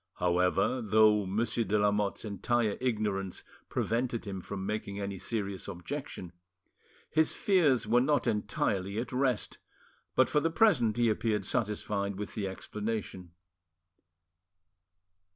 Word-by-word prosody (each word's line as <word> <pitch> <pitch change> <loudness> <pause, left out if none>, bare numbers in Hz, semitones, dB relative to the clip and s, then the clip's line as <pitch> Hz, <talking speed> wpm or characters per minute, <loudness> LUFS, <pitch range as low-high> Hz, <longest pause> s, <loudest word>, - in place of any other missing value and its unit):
However, 90 +7 +1
though 105 -1 +4
Monsieur 110 +4 0
de 105 -1 +1
Lamotte's 105 0 +1
entire 110 +1 0
ignorance 105 -6 -1 0.3
prevented 120 0 -1
him 95 -2 -5
from 95 +1 -5
making 100 -1 -3
any 100 -1 -4
serious 100 -2 -3
objection, 100 - -6 0.8
his 160 0 +3
fears 155 - +3
were 120 +3 +4
not 145 0 +2
entirely 100 -2 -1
at 120 +1 -3
rest, 130 -3 0 0.6
but - - +5
for 150 - +2
the 165 - +1
present 160 - +3
he 120 -1 +3
appeared 110 -2 0
satisfied 105 -3 -1
with 105 +1 -6
the 105 -3 -2
explanation. 95 -2 -5
105 Hz, 120 wpm, -30 LUFS, 100-120 Hz, 0.8 s, but